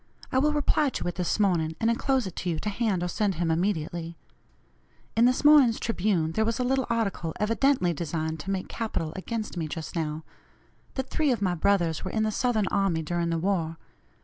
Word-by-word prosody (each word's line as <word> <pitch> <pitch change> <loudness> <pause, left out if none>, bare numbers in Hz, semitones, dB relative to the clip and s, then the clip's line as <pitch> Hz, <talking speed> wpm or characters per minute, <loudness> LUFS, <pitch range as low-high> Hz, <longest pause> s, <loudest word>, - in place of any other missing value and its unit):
I 260 - +3
will 300 +3 +3
reply 295 0 +2
to 250 - -4
it 175 - -1
this 180 +3 -1
morning, 170 -6 +2
and 225 - +1
enclose 260 +1 +1
it 185 - -6
to 180 - -2
you 165 - -1
to 210 - -2
hand 205 -4 0
or - - 0
send 200 +1 0
him 165 0 0
immediately. 170 -1 -2 1.0
In 230 - +5
this 255 +3 +2
morning's 285 -6 +7
Tribune 185 -7 0
there 220 +6 +1
was 230 +1 0
a - - +1
little 265 +1 +1
article 200 -8 -1
evidently 230 -3 +2
designed 160 0 -3
to 190 - -6
make 190 -1 -2
capital 190 -9 -3
against 215 +1 -4
me 160 -2 -2
just 160 +2 -6
now 155 -1 -2 0.7
that 265 -1 -4
three 305 -3 +2
of 240 - 0
my 185 -2 +2
brothers 170 -3 +1
were 185 - -3
in 220 +3 0
the 215 - +1
Southern 220 -2 +1
army 190 -5 +1
during 170 +1 -1
the 165 - 0
war. 165 -2 -1
195 Hz, 205 wpm, -27 LUFS, 165-230 Hz, 1.0 s, morning's